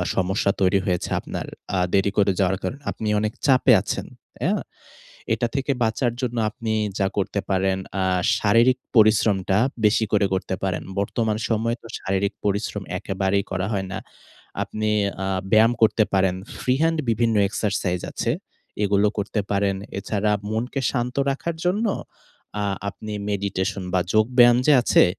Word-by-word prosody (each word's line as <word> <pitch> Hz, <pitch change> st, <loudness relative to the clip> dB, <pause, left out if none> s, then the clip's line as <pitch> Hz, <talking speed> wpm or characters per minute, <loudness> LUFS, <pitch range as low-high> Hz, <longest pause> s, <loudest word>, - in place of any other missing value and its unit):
সমস্যা 95 Hz, +1 st, +1 dB
তৈরি 95 Hz, +1 st, +4 dB
হয়েছে 90 Hz, -2 st, -1 dB
আপনার -, -, -5 dB, 0.3 s
আ -, -, +1 dB, 0.2 s
দেরি 100 Hz, 0 st, +3 dB
করে 100 Hz, -1 st, +4 dB
যাওয়ার 95 Hz, -1 st, +2 dB
কারণে। 140 Hz, -, -4 dB
আপনি 110 Hz, -, -5 dB
অনেক 105 Hz, +1 st, -1 dB
চাপে 130 Hz, -2 st, +5 dB
আছেন।" -, -, -3 dB, 0.4 s
অ্যা? -, -, +2 dB, 0.8 s
এটা 120 Hz, +2 st, 0 dB
থেকে 140 Hz, 0 st, 0 dB
বাঁচার 115 Hz, +2 st, 0 dB
জন্য 120 Hz, -2 st, -2 dB
আপনি 110 Hz, +1 st, -4 dB, 0.3 s
যা 100 Hz, -, +2 dB
করতে 100 Hz, 0 st, -1 dB
পারেন, 95 Hz, 0 st, +1 dB, 0.2 s
আ -, -, +1 dB, 0.4 s
শারীরিক 115 Hz, +5 st, +4 dB, 0.2 s
পরিশ্রমটা 105 Hz, -3 st, +4 dB, 0.3 s
বেশি 105 Hz, +1 st, +4 dB
করে 105 Hz, -1 st, +3 dB
করতে 95 Hz, 0 st, -2 dB
পারেন। 95 Hz, -2 st, -1 dB, 0.2 s
বর্তমান 110 Hz, +2 st, 0 dB
সময়ে 115 Hz, +1 st, 0 dB
তো -, -, -12 dB
শারীরিক 95 Hz, +1 st, -1 dB
পরিশ্রম 100 Hz, 0 st, -1 dB, 0.2 s
একেবারেই 95 Hz, +1 st, -1 dB
করা 95 Hz, 0 st, -1 dB
হয় 95 Hz, -2 st, -1 dB
না। 95 Hz, -, -3 dB, 0.6 s
আপনি 110 Hz, 0 st, -2 dB, 0.3 s
আ -, -, -1 dB, 0.3 s
ব্যায়াম 110 Hz, +2 st, +6 dB
করতে 110 Hz, 0 st, +4 dB
পারেন। 95 Hz, -1 st, +3 dB, 0.2 s
ফ্রি 125 Hz, -, +1 dB
হ্যান্ড 165 Hz, 0 st, +2 dB
বিভিন্ন 115 Hz, 0 st, +1 dB
এক্সারসাইজ 100 Hz, -3 st, -1 dB
আছে। -, -, -2 dB, 0.5 s
এগুলো 100 Hz, +1 st, +3 dB
করতে 105 Hz, +1 st, -1 dB
পারেন। 100 Hz, -1 st, +1 dB, 0.2 s
এছাড়া 105 Hz, +1 st, 0 dB, 0.2 s
মনকে 120 Hz, +5 st, -2 dB
শান্ত 125 Hz, -1 st, -2 dB
রাখার 160 Hz, +4 st, -3 dB
জন্য 200 Hz, +6 st, +1 dB, 0.8 s
আ -, -, 0 dB, 0.2 s
আপনি 105 Hz, +1 st, -7 dB, 0.2 s
মেডিটেশন 100 Hz, 0 st, -2 dB
বা, 90 Hz, -, +4 dB
যোগব্যায়াম 120 Hz, +2 st, +5 dB
যে 150 Hz, -, +6 dB
আছে, -, -, +5 dB
105 Hz, 150 wpm, -23 LUFS, 95-115 Hz, 0.8 s, ব্যায়াম